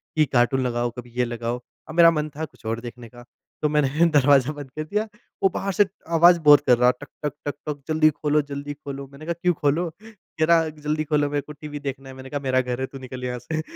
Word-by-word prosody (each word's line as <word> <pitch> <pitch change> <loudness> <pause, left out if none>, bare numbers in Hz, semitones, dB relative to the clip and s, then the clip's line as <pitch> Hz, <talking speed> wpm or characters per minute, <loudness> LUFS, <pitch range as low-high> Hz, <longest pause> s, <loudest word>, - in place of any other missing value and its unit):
कि 155 - +4
कार्टून 125 +2 +3
लगाओ, 120 0 -1
कभी 120 -1 -9
ये 125 - +3
लगाओ। 120 +1 -4 0.3
अब 160 - -7
मेरा 170 -1 +8
मन 155 -1 -2
था 160 - -2
कुछ 135 - -21
और 115 +1 -2
देखने 120 -1 -9
का। 120 +1 -14 0.4
तो 150 - +2
मैंने 150 +2 +2
दरवाज़ा 145 -1 +4
बंद 145 -2 -9
कर 155 - -1
दिया। 210 +7 -2 0.4
वो 195 - +6
बाहर 195 - -1
से 205 +1 +4 0.3
आवाज़ 175 +1 +7
बहुत 145 -2 +7
कर 125 - +6
रहा, 125 +1 +5
टक, 125 +4 -12 0.2
टक, 145 - -1
टक, 145 - -1
टक, 145 -2 -4
"जल्दी 155 0 +4
खोलो, 150 0 +1
जल्दी 145 +1 -5
खोलो।" 140 -1 -8
मैंने 140 +3 -11
कहा, 170 - -1
"क्यों 180 -1 +3
खोलो?" 155 +4 0
कह 210 -7 -6
रहा, 165 -1 +4 0.2
"जल्दी 155 +1 0
खोलो, 145 -1 +1
मेरे 145 0 -1
को 150 +2 -11
टीवी 150 0 -8
देखना 135 -1 -6
है।" 130 - -10
मैंने 130 0 -10
कहा, 145 - -3
"मेरा 130 0 +3
घर 125 0 -4
है, 130 - -1
तू 135 - -10
निकल 130 -1 -8
यहाँ 125 0 -3
से।" 155 +6 -3
145 Hz, 250 wpm, -24 LUFS, 130-155 Hz, 0.4 s, मेरा